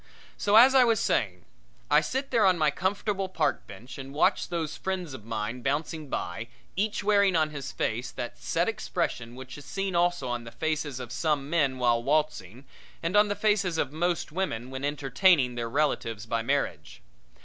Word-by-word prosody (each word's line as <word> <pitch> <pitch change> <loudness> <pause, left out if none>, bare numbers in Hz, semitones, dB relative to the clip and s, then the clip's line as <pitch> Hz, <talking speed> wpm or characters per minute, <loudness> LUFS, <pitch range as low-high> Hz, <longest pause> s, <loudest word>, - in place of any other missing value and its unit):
So, 205 +1 +1
as 250 +4 +8
I 260 -1 +7
was 230 -3 +3
saying, 90 -5 0 0.5
I - - +6
sit 270 +2 -3
there 230 -4 +3
on 185 -2 +5
my 155 -2 +3
comfortable 195 +2 -1
park 165 -4 -1
bench 120 +7 -10
and 135 +1 -8
watch 185 +5 +2
those 165 -3 -3
friends 185 -6 -4
of 110 -5 -9
mine 115 +2 -4
bouncing 150 +2 -2
by, 105 +3 -4 0.3
each 210 +2 -1
wearing 200 -2 +4
on 155 -1 +2
his 140 -3 -6
face 120 +3 -2
that 120 -1 -6
set 170 +1 0
expression 170 - -3
which 130 +1 -9
is 145 - -13
seen 195 +2 -3
also 175 -5 +1
on 120 -1 -3
the 115 - -10
faces 150 0 -2
of 125 -2 -7
some 145 +1 -1
men 140 -6 +2
while 120 -2 +2
waltzing, 135 - -1 0.4
and 170 +4 -1
on 210 0 +6
the 205 - -1
faces 205 -4 +1
of 140 -2 -1
most 170 0 -1
women 130 -9 -3
when 130 +1 -6
entertaining 145 0 +3
their 120 -1 -3
relatives 115 -6 -1
by 115 0 -1
marriage. 135 - -2
150 Hz, 185 wpm, -28 LUFS, 125-185 Hz, 0.5 s, as